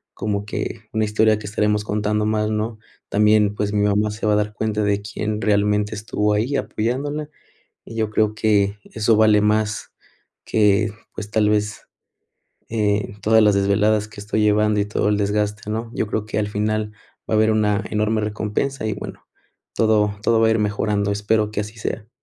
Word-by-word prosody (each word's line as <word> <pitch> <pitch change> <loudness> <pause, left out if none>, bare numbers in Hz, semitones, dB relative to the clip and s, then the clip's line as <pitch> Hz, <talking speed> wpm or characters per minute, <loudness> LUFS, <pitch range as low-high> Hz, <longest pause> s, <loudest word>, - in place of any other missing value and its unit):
como 100 -1 -2
que 110 +2 -4
una 110 -1 +1
historia 110 +1 +3
que 105 - -9
estaremos 105 0 0
contando 105 0 -1
más, 105 0 0
¿no?, 110 +1 -2 0.3
también 105 0 +3
pues, 105 0 -1
mi 105 -1 +2
mamá 105 +1 +2
se 105 +1 -5
va 105 - +3
a - - +4
dar 105 0 -1
cuenta 105 0 -1
de 100 0 +1
quién 105 0 -3
realmente 105 0 +1
estuvo 105 0 -1
ahí 115 +7 0
apoyándola 135 +8 -2 0.6
y 115 - -10
yo 110 -1 0
creo 110 0 +1
que 105 -2 +2
eso 110 0 +1
vale 110 -1 +5
más 105 0 0 0.5
que, 105 0 +2 0.2
pues, 105 -1 -7
tal 110 -1 +3
vez, 105 -1 0 0.9
eh, 105 -2 0
todas 110 +1 +5
las 105 -1 +4
desveladas 105 +2 +2
que 105 -1 -13
estoy 105 +1 -1
llevando 105 0 +3
y 100 - +1
todo 105 0 0
el 105 - +2
desgaste, 105 0 -1
¿no?, 115 +1 -4
yo - - 0
creo 105 0 -2
que 110 - -4
al 105 - 0
final 105 +1 -1 0.4
va - - 0
a - - +3
haber 110 0 +4
una 105 -1 +1
enorme 110 +1 +1
recompensa 110 +5 -2
y, 110 - 0
bueno, 105 - -8 0.5
todo 105 -2 +2
todo 115 0 +3
va 115 - +5
a - - +3
ir 110 - +2
mejorando. 105 -1 0
Espero 105 +1 0
que 105 - -1
así 105 +2 -8
sea. 110 0 -5
105 Hz, 190 wpm, -21 LUFS, 105-110 Hz, 0.9 s, vale